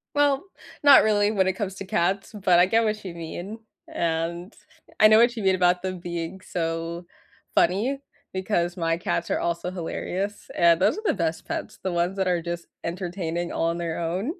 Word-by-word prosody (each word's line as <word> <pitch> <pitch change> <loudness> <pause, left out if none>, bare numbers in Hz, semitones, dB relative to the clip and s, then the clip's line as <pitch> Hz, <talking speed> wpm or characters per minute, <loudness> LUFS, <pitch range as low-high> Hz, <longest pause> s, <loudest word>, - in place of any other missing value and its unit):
Well, 285 0 +3 0.4
not 285 -1 +9
really 210 -1 +3
when 190 -3 +2
it 190 - +2
comes 195 -1 -4
to 195 - -7
cats, 190 +3 0
but 185 -4 +3
I 180 - +6
get 225 +3 +3
what 215 -1 -1
you 175 -3 -7
mean, 175 +6 -7 0.3
and 170 +2 -2 0.5
I 215 - +9
know 215 0 +7
what 240 +1 +4
you 225 - -4
mean 190 -1 +4
about 180 0 +3
them 185 -1 -4
being 170 +1 -5
so 165 0 -3 0.5
funny 220 +11 +2 0.3
because 185 -2 -1
my 165 -1 0
cats 170 0 -2
are - - +1
also 170 +1 -2
hilarious, 190 +3 -4
and 170 -1 +5
those 185 - +3
are - - -7
the - - +3
best 165 -2 -2
pets, - - -5
the 190 - -1
ones 175 +2 0
that 190 -1 0
are 175 -2 +1
just 170 0 -5 0.2
entertaining 175 -1 -3
on 165 +1 0
their 170 -1 -3
own. 185 - -2
180 Hz, 190 wpm, -25 LUFS, 170-200 Hz, 0.5 s, not